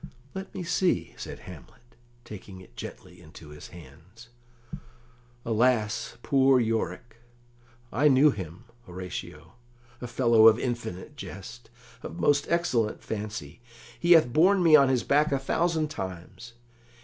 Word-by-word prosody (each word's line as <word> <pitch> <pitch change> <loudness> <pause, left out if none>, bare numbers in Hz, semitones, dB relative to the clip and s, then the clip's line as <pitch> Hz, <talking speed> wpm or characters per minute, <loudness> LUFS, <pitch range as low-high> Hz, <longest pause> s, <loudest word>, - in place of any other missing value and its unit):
"Let 190 0 -7
me 185 - -4
see," 180 +1 0
said - - -9
Hamlet, 120 0 -14 0.3
taking 95 -2 -10
it 90 -10 -17
gently 90 -1 -10
into 80 -1 -14
his 75 0 -11
hands. 85 - -15 1.2
"Alas, 115 -1 0
poor 135 -2 +4
Yorick! 115 0 -3 0.8
I 145 +5 +3
knew 140 +2 +5
him, 90 - -8 0.2
Horatio 90 0 -8 0.5
a 125 - -5
fellow 115 -2 +5
of 110 0 +6
infinite 120 -8 -5
jest, - - -10 0.3
of 85 - -8
most 145 +10 +2
excellent 125 -11 0
fancy: 105 -4 -6 0.4
he 175 0 +5
hath 155 -8 +4
borne 185 +4 +4
me 160 -2 +7
on 140 -3 +6
his 130 -2 +1
back 150 +2 +2
a 140 - +2
thousand 160 +3 0
times. 95 - -8
115 Hz, 130 wpm, -27 LUFS, 95-145 Hz, 1.2 s, me